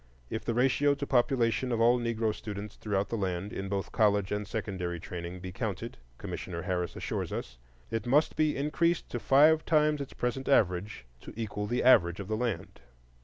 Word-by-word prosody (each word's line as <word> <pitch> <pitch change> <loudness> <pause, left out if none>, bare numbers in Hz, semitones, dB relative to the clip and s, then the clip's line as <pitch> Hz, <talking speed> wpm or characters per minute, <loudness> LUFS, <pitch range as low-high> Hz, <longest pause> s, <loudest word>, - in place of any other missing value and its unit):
If 110 - -3
the 115 - -2
ratio 135 +3 +3
to 140 - -4
population 125 -2 +2
of 115 - 0
all 120 +2 +5
Negro 115 -2 0
students 105 -1 -7
throughout 100 -1 -2
the - - -2
land, 95 +1 -2
in 95 0 -4
both 100 -1 -3
college 105 -3 +2
and 105 0 -2
secondary 95 -6 -3
training, 90 0 -7
be 90 0 -6
counted, - - -4 0.2
Commissioner 85 -2 -5
Harris 90 -3 -2
assures - - -3
us - - -6 0.3
"it 115 +1 -2
must 145 +5 +3
be 155 -1 +1
increased 165 +4 0
to 120 - -2
five 155 +6 +5
times 150 -2 +2
its 140 - -7
present 125 +2 -2
average" 95 - +1
to - - -11
equal 105 -2 -3
the 120 +3 0
average 85 -8 +5
of 100 - -5
the 110 - 0
land. 120 - -3
110 Hz, 185 wpm, -30 LUFS, 95-130 Hz, 0.3 s, all